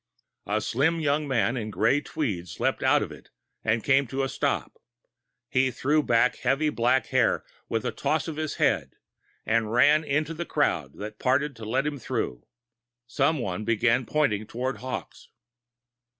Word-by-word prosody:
A 105 Hz, +2 st, 0 dB
slim 160 Hz, +10 st, +1 dB
young 150 Hz, -1 st, 0 dB
man 125 Hz, -2 st, +1 dB
in 110 Hz, -3 st, -3 dB
gray 115 Hz, +9 st, +2 dB
tweeds 105 Hz, -, -4 dB
leaped -, -, 0 dB
out -, -, +4 dB
of -, -, -6 dB
it -, -, -13 dB, 0.3 s
and 110 Hz, 0 st, +1 dB
came 135 Hz, -1 st, +3 dB
to 135 Hz, +3 st, -2 dB
a 135 Hz, -, -1 dB
stop. -, -, -2 dB, 0.7 s
He 130 Hz, 0 st, +2 dB
threw 145 Hz, +5 st, +1 dB
back 125 Hz, -2 st, +2 dB
heavy 150 Hz, +2 st, +1 dB
black 125 Hz, +1 st, +2 dB
hair 130 Hz, -3 st, +2 dB, 0.2 s
with -, -, -1 dB
a -, -, 0 dB
toss -, -, -1 dB
of 160 Hz, -, -4 dB
his 155 Hz, -1 st, -3 dB
head -, -, +1 dB, 0.5 s
and 110 Hz, -1 st, +1 dB
ran 145 Hz, +6 st, +5 dB
into 150 Hz, +2 st, -1 dB
the 170 Hz, +2 st, -4 dB
crowd -, -, 0 dB
that 105 Hz, +1 st, -7 dB
parted 140 Hz, +2 st, +1 dB
to 110 Hz, -, -8 dB
let 130 Hz, +6 st, 0 dB
him 145 Hz, -2 st, -3 dB
through. -, -, -3 dB, 0.6 s
Someone 125 Hz, -, 0 dB
began 115 Hz, +2 st, +2 dB
pointing 110 Hz, -9 st, +1 dB
towards 125 Hz, -1 st, -3 dB
Hawkes. 130 Hz, +2 st, -7 dB
130 Hz, 165 wpm, -26 LUFS, 115-145 Hz, 0.7 s, ran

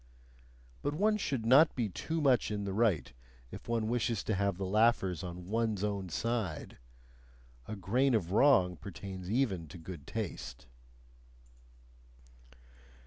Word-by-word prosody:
But 145 Hz, +1 st, -2 dB
one 210 Hz, +5 st, +2 dB
should 135 Hz, -, -2 dB
not 140 Hz, +7 st, +6 dB
be 120 Hz, -4 st, 0 dB
too 160 Hz, -, -3 dB
much 130 Hz, -5 st, +3 dB
in 105 Hz, -1 st, -3 dB
the 100 Hz, -1 st, -3 dB
right 100 Hz, -, +1 dB, 0.4 s
if -, -, -10 dB
one 115 Hz, -2 st, 0 dB
wishes 115 Hz, -2 st, 0 dB
to 110 Hz, -, -1 dB
have 100 Hz, -1 st, 0 dB
the 95 Hz, -, -3 dB
laughers 95 Hz, -4 st, +2 dB
on 90 Hz, 0 st, -7 dB
ONE'S 110 Hz, 0 st, -1 dB
OWN 100 Hz, -3 st, -2 dB
side; 110 Hz, -3 st, -3 dB, 0.9 s
a 110 Hz, -, -4 dB
grain 120 Hz, +7 st, +2 dB
of 90 Hz, -5 st, -1 dB
wrong 95 Hz, -, +4 dB
pertains 95 Hz, +1 st, -8 dB
even 105 Hz, -8 st, 0 dB
to 90 Hz, -, -10 dB
good 80 Hz, -3 st, -9 dB
taste. -, -, -5 dB
105 Hz, 140 wpm, -32 LUFS, 95-120 Hz, 0.9 s, not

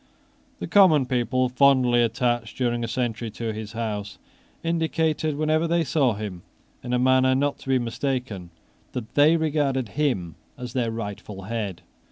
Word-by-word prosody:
The -, -, -5 dB
common 165 Hz, -9 st, +5 dB
people, 130 Hz, +1 st, 0 dB
fondly 125 Hz, -2 st, +4 dB
attached 120 Hz, -1 st, 0 dB
during 120 Hz, -2 st, 0 dB
a -, -, -2 dB
century 115 Hz, -1 st, -2 dB
to 115 Hz, -2 st, -3 dB
his 110 Hz, 0 st, -7 dB
house, 105 Hz, -3 st, -4 dB, 0.5 s
indicated, 160 Hz, -2 st, 0 dB
whenever 155 Hz, +2 st, +1 dB
they 170 Hz, 0 st, +2 dB
saw 135 Hz, -5 st, +1 dB
him, 100 Hz, -4 st, -6 dB, 0.4 s
in 120 Hz, -, -5 dB
a 125 Hz, -, +2 dB
manner 130 Hz, +1 st, +4 dB
not 140 Hz, +1 st, 0 dB
to -, -, -10 dB
be 130 Hz, -, +4 dB
mistaken, 120 Hz, -6 st, -3 dB, 0.4 s
that 120 Hz, -1 st, -6 dB
they 150 Hz, +4 st, +5 dB
regarded 145 Hz, -6 st, 0 dB
him 125 Hz, -, -1 dB, 0.2 s
as 125 Hz, -1 st, -7 dB
their 120 Hz, -3 st, 0 dB
rightful 105 Hz, -3 st, -6 dB
head. 105 Hz, -3 st, -4 dB
125 Hz, 155 wpm, -24 LUFS, 115-145 Hz, 0.5 s, common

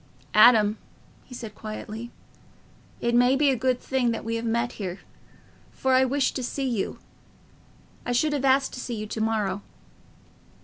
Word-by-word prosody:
"Adam," 215 Hz, -1 st, +6 dB, 0.5 s
he 250 Hz, -, -11 dB
said, 225 Hz, -3 st, -7 dB
quietly, 215 Hz, +2 st, -7 dB, 0.9 s
"it 235 Hz, -, 0 dB
may 245 Hz, +2 st, +5 dB
be 280 Hz, 0 st, +3 dB
a -, -, +1 dB
good 255 Hz, +1 st, 0 dB
thing 260 Hz, -3 st, 0 dB
that 230 Hz, -, -3 dB
we 230 Hz, -, -2 dB
have 230 Hz, 0 st, -3 dB
met 235 Hz, +1 st, 0 dB
here, 185 Hz, -1 st, -4 dB, 0.7 s
for 265 Hz, 0 st, 0 dB
I 260 Hz, 0 st, +5 dB
wished 275 Hz, +1 st, 0 dB
to 260 Hz, -, -3 dB
see 270 Hz, +2 st, -2 dB
you. 230 Hz, -6 st, -2 dB, 1.1 s
I -, -, -3 dB
should 295 Hz, +5 st, +2 dB
have 280 Hz, -2 st, -1 dB
asked 270 Hz, 0 st, +3 dB
to -, -, -6 dB
see 245 Hz, -1 st, -4 dB
you 215 Hz, -1 st, -4 dB
to 220 Hz, +1 st, -4 dB
morrow." 210 Hz, -3 st, 0 dB
240 Hz, 170 wpm, -26 LUFS, 220-260 Hz, 1.1 s, Adam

